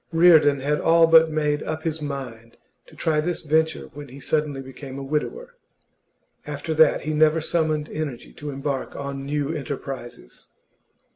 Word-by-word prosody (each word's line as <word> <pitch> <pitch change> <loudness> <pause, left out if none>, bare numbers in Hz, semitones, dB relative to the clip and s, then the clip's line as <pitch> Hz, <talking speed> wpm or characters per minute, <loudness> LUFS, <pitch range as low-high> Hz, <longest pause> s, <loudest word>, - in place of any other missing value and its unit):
Reardon 160 -5 +5
had 150 +2 0
all 165 0 +5
but 165 0 +6
made 150 -1 0
up 155 0 -4
his 160 -1 -2
mind 125 -6 -7 0.3
to - - -17
try 155 -1 +1
this 175 +2 -3
venture 160 0 0
when 145 +1 -9
he 135 +2 -12
suddenly 150 0 -1
became 135 +1 -9
a 140 - -5
widower; 155 - -3 0.9
after 150 +2 -3
that 155 -1 +4
he 155 +2 -3
never 155 +1 +4
summoned 155 -2 0
energy 145 -6 -6
to 150 - -7
embark 135 -1 -4
on 140 -1 -5
new 145 +1 -1
enterprises. 135 - -7
150 Hz, 155 wpm, -23 LUFS, 140-160 Hz, 0.9 s, but